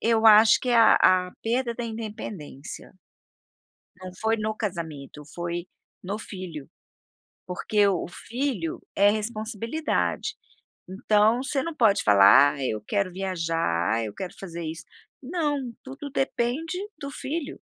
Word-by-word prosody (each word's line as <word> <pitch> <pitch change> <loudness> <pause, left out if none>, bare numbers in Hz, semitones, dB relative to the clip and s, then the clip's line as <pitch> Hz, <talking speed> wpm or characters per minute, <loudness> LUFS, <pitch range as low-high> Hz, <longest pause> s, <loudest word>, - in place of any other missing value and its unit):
Eu 225 0 +3
acho 215 +1 +8
que 250 - -2
a 230 -2 +6
a 185 -1 +4
perda 235 +1 0
da 240 - -4
independência. 210 -11 -7 1.1
Não 185 0 -7
foi 225 +1 +2
no 215 0 -2
casamento, 160 - -5
foi 175 0 -4 0.4
no 200 +3 -3
filho. 185 -9 -8 0.8
Porque 205 +3 +1
o 185 -4 0
filho 230 - -4
é 200 +1 +5
responsabilidade, 225 - -2 0.6
então, 215 +5 +3
você 275 -1 -1
não 335 - -4
pode 220 -7 +4
falar: 105 +8 +7
"Ah, 140 - -5
eu 110 -3 -2
quero 200 -3 0
viajar. 165 - -1
Ah, 115 - 0
eu 105 -2 -5
quero 185 - -6
fazer 170 -3 -6
isso", 160 +1 -6 0.4
Não! 290 -5 -2
Tudo 275 +2 -8
depende 270 +5 -1 0.2
do 280 -1 -6
filho. 290 +2 -5
210 Hz, 130 wpm, -26 LUFS, 170-240 Hz, 1.1 s, acho